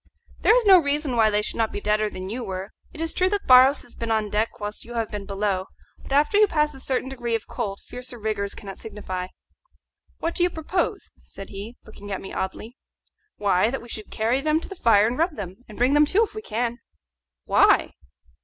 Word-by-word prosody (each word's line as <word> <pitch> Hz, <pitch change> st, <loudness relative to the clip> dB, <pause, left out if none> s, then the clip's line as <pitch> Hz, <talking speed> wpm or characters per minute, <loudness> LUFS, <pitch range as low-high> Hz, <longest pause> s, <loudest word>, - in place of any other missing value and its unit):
"There 445 Hz, -, +5 dB
is -, -, +1 dB
no 380 Hz, -3 st, +9 dB
reason 285 Hz, -3 st, -1 dB
why 220 Hz, -2 st, +5 dB
they 210 Hz, 0 st, +1 dB
should 225 Hz, -, 0 dB
be -, -, -4 dB
deader 210 Hz, +1 st, +1 dB
than 185 Hz, -2 st, -7 dB
you 235 Hz, +5 st, -4 dB
were. 190 Hz, -1 st, -5 dB, 0.2 s
It 320 Hz, -, -9 dB
is 325 Hz, 0 st, -1 dB
true 370 Hz, 0 st, +2 dB
that 405 Hz, 0 st, -2 dB
Barros 260 Hz, +2 st, +7 dB
has 245 Hz, -, -15 dB
been 230 Hz, -, -4 dB
on 215 Hz, -2 st, 0 dB
deck 215 Hz, +2 st, -1 dB
whilst 210 Hz, 0 st, -5 dB
you 240 Hz, +1 st, -9 dB
have 225 Hz, -2 st, -1 dB
been 205 Hz, -2 st, -6 dB
below; 195 Hz, -2 st, -1 dB, 0.3 s
but -, -, -13 dB
after 295 Hz, +8 st, +3 dB
you 425 Hz, -, +6 dB
pass 300 Hz, -4 st, +1 dB
a 270 Hz, -, -11 dB
certain 260 Hz, 0 st, -2 dB
degree 240 Hz, -3 st, -2 dB
of 225 Hz, -, -4 dB
cold 200 Hz, -5 st, -4 dB
fiercer 250 Hz, 0 st, -7 dB
rigours 210 Hz, -2 st, -2 dB
cannot 195 Hz, -2 st, -9 dB
signify." 190 Hz, -4 st, -5 dB, 0.9 s
"What 335 Hz, -, -2 dB
do -, -, -1 dB
you 355 Hz, -, +4 dB
propose?" 340 Hz, +2 st, -2 dB
said 195 Hz, -, -11 dB
he, 205 Hz, +5 st, -8 dB
looking 205 Hz, -1 st, -11 dB
at 195 Hz, -, -2 dB
me 190 Hz, -, -9 dB
oddly. 220 Hz, +6 st, -5 dB, 0.6 s
"Why, 200 Hz, 0 st, +2 dB
that 270 Hz, -, -3 dB
we 240 Hz, -, -13 dB
should 215 Hz, -2 st, -5 dB
carry 230 Hz, +5 st, 0 dB
them 310 Hz, +2 st, +2 dB
to -, -, -6 dB
the -, -, -6 dB
fire 215 Hz, -, +4 dB
and 240 Hz, +5 st, -1 dB
rub 330 Hz, -1 st, +1 dB
them, 190 Hz, -4 st, -6 dB
and 210 Hz, -, -11 dB
bring 250 Hz, +3 st, +3 dB
them 295 Hz, 0 st, +5 dB
to 410 Hz, +8 st, +3 dB
if 445 Hz, -, -4 dB
we 435 Hz, -, -6 dB
can." 240 Hz, -, -2 dB, 0.7 s
"Why?" -, -, +4 dB
230 Hz, 225 wpm, -24 LUFS, 210-290 Hz, 0.9 s, no